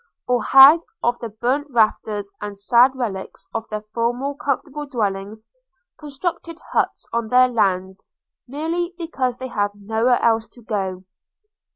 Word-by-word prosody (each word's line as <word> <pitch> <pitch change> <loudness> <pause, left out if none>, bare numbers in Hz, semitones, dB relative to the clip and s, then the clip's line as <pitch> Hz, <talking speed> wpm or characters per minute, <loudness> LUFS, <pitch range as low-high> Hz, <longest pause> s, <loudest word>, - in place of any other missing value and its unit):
– - - -64
or 250 -1 +2
had, 270 +7 +8 0.2
of 240 0 +1
the 230 - -5
burnt 250 +7 -1
rafters 215 -4 0
and 205 -1 -6
sad 240 +6 +4
relics 210 -7 -5
of 225 0 -4
their 215 0 -4
former 245 +4 -1
comfortable 285 +1 -3
dwellings, 215 -3 -3 0.5
constructed 325 +3 -5
huts - - -1
on 235 -1 -1
their 255 +2 +5
lands, 190 -5 -1 0.4
merely 335 +6 -3
because 265 -8 -2
they 260 0 -6
had 205 -3 0
nowhere 225 +4 +1
else 225 -1 +2
to 240 - -18
go. 190 -4 -3
240 Hz, 145 wpm, -21 LUFS, 210-270 Hz, 0.5 s, had